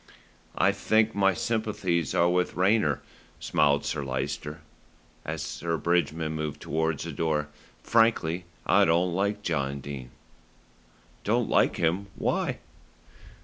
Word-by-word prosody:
"I 100 - +4
think 110 +2 +2
my 95 -2 +3
sympathies 105 - -1
are 85 - +4
with 90 0 +1
Rayner," 90 -6 +2 0.4
smiled 70 -1 +2
Sir 75 -1 -2
Lyster, 70 +4 -4 0.6
as - - -4
Sir 85 -1 -3
Bridgman 80 -1 0
moved 75 -1 -4
towards 80 -1 -1
the - - -5
door. 75 -2 -1 0.3
"Frankly, 95 -7 +2 0.2
I - - +5
don't 85 +2 +2
like 100 +3 -1
John 70 -5 -1
Dene." 65 -2 -7 1.1
"Don't - - +1
like - - +3
him! 85 +5 0
Why?" - - -1
85 Hz, 120 wpm, -27 LUFS, 75-95 Hz, 1.1 s, I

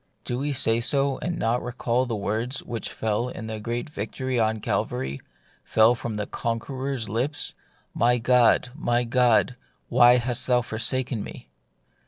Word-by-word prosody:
Do 120 - -3
we 145 +2 -1
say 115 -4 +3
so, 135 +2 +1
and 175 +1 -3
not 120 -1 0
recall 125 0 -1
the 115 - -2
words 110 +6 -2
which 115 -2 -5
fell 110 +3 -2
in 110 - -7
that 110 -1 -5
great 120 +2 -3
victory 130 0 -3
on 110 0 +1
Calvary 65 -7 -3 0.2
— - - -37 0.2
fell 110 +2 +4
from 115 -2 -5
the 105 -1 -3
Conqueror's 130 +2 -3
lips, 125 +8 -2 0.2
" - - -38
My 120 +1 +4
God, 125 0 +3
my 120 -5 0
God, 125 0 +2 0.3
why 120 0 +6
hast 125 0 +3
thou 125 -1 +3
forsaken 120 0 -1
me - - -11
120 Hz, 165 wpm, -25 LUFS, 110-130 Hz, 0.3 s, why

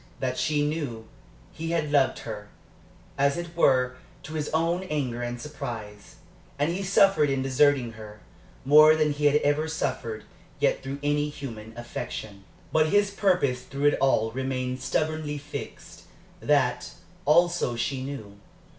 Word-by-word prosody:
That 130 -1 -1
she 150 -1 +1
knew. 145 -8 -3 0.5
He 165 +1 -2
loved 145 -3 +2
her, 105 -2 -6 0.7
as 140 +3 +3
it 170 -1 -6
were, 125 -5 +3 0.3
to 155 - -8
his 150 -2 -2
own 165 +3 +1
anger 130 -6 -2
and 120 0 -4
surprise. 115 -8 -7 0.4
And 145 +3 +1
he 185 +3 -3
suffered 195 -5 +4
in 135 -1 0
deserting 135 -2 +3
her, 105 -1 -11 0.5
more 155 +3 +8
than 155 -1 +2
he 145 0 +2
had 145 - +3
ever 145 +2 +1
suffered 115 -8 -3 0.4
yet - - +2
through 135 +1 -5
any 145 0 +1
human 115 -7 -8
affection. 110 -4 -6 0.3
But 155 0 +3
his 205 +3 +3
purpose 180 -11 +1
through 140 +3 +1
it - - -1
all 110 -5 +2
remained 130 0 -3
stubbornly 155 +2 -1
fixed; 145 +1 -9 0.4
that, 140 -4 +1 0.3
also, 170 -5 +3
she 130 +2 -2
knew. 110 -8 -7
140 Hz, 145 wpm, -26 LUFS, 125-155 Hz, 0.7 s, more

